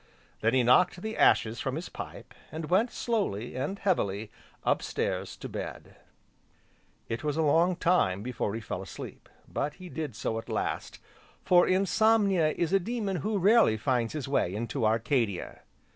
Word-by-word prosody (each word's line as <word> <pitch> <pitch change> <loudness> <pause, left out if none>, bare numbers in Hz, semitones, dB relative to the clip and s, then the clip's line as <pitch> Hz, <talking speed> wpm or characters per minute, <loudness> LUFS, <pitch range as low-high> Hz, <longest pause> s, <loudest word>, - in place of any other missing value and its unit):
Then 115 +3 +2
he 130 - +4
knocked 175 +9 +4
the 220 0 -3
ashes 115 +1 +3
from 130 0 -2
his 165 +3 -5
pipe, - - -9 0.2
and 160 +1 -6
went, 215 +7 +4
slowly, 195 - -2
and 145 +10 -2
heavily, 110 - -1 0.3
up - - +2
stairs - - -3
to - - -7
bed. - - -7 1.1
It 115 +5 -4
was 150 0 -1
a 160 - +2
long 165 +5 +3
time 105 - +2
before 120 -4 -2
he 115 - -4
fell 105 - -5
asleep, - - -9 0.2
but 150 +1 -3
he 185 -1 -10
did 155 -9 -5
so 110 +1 -2
at - - -11
last, - - -3 0.5
for 175 -1 +5
Insomnia 195 -2 +3
is 170 +1 -1
a 195 - +5
demon 205 -1 -2
who 210 +4 -1
rarely 200 - +5
finds 120 -1 0
his 150 -3 -4
way 100 -9 0
into 115 0 -1
Arcadia. 115 - 0
155 Hz, 165 wpm, -29 LUFS, 115-190 Hz, 1.1 s, for